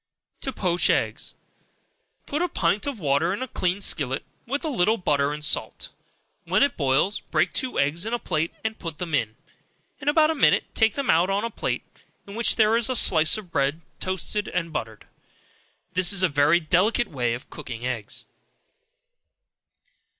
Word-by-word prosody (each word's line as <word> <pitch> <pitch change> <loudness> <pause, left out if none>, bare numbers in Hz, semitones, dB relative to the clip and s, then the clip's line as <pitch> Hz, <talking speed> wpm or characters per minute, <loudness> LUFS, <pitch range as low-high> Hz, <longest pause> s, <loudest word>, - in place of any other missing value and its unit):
To 265 - -3
Poach 180 -7 +1
Eggs. - - -1 0.9
Put 300 +3 -2
a 355 - 0
pint 190 - 0
of 275 -6 -4
water 145 +2 +1
in 255 - -4
a - - -5
clean 185 -3 -1
skillet, 135 -8 +1 0.2
with 280 +6 -2
a - - 0
little 225 -5 +2
butter 145 -6 +1
and 150 0 -5
salt; - - -2 0.6
when - - +3
it 280 - +1
boils, 140 +8 +1
break - - 0
two 255 -1 -1
eggs 145 +5 +1
in - - -3
a 240 - +1
plate, 165 -7 -2
and 220 0 -3
put 165 -4 -6
them 170 -3 -5
in; 110 -6 0 0.6
in 290 - -10
about 310 +1 +4
a - - 0
minute, 300 - +3
take 220 -1 +3
them 280 -2 +1
up 170 +3 +3
on 200 +2 0
a 230 - -3
plate, - - -3 0.4
in 200 - -10
which 230 +2 +3
there 220 0 +4
is 235 0 +2
a 255 - 0
slice 160 -5 +5
of 195 -5 -10
bread 140 +3 0 0.2
toasted 190 +3 -2
and 165 -2 -3
buttered. 110 -6 -5 0.9
This 180 +1 +4
is 195 -2 +1
a - - +6
very 145 +3 +3
delicate 185 +8 +1
way 120 -4 -1
of 125 - -12
cooking 120 -1 -7
eggs. 115 -5 -4
180 Hz, 180 wpm, -24 LUFS, 150-225 Hz, 0.9 s, a